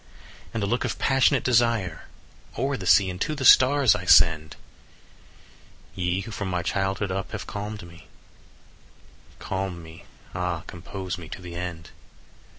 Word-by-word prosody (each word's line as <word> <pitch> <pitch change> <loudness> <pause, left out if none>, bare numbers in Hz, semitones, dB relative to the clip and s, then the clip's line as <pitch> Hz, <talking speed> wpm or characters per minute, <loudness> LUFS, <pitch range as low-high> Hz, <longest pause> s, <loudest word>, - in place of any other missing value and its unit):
And 110 -3 -3
a - - +1
look 120 +5 -1
of - - -3
passionate 135 -1 +2
desire 115 -8 +1 0.5
5 - - -7
O'er 135 +1 0
the 95 -7 -6
sea 95 +2 +5
and 90 +1 -9
to 155 - -1
the 135 -3 -3
stars 130 -3 +6
I 100 -3 -5
send: 80 -2 +4 1.4
"Ye 90 +1 -1
who 115 - -8
from 100 -2 -4
my 90 -1 -2
childhood 95 +2 -1
up 95 0 -4
have - - -5
calm'd 105 0 -6
me, 85 -1 -15 1.3
Calm 95 -3 -4
me, 80 0 -13 0.3
ah, 90 -2 -2
compose 90 +1 -7
me 80 -2 -10
to - - -7
the 90 -1 -8
end! 85 -1 -6
95 Hz, 155 wpm, -25 LUFS, 85-105 Hz, 1.4 s, stars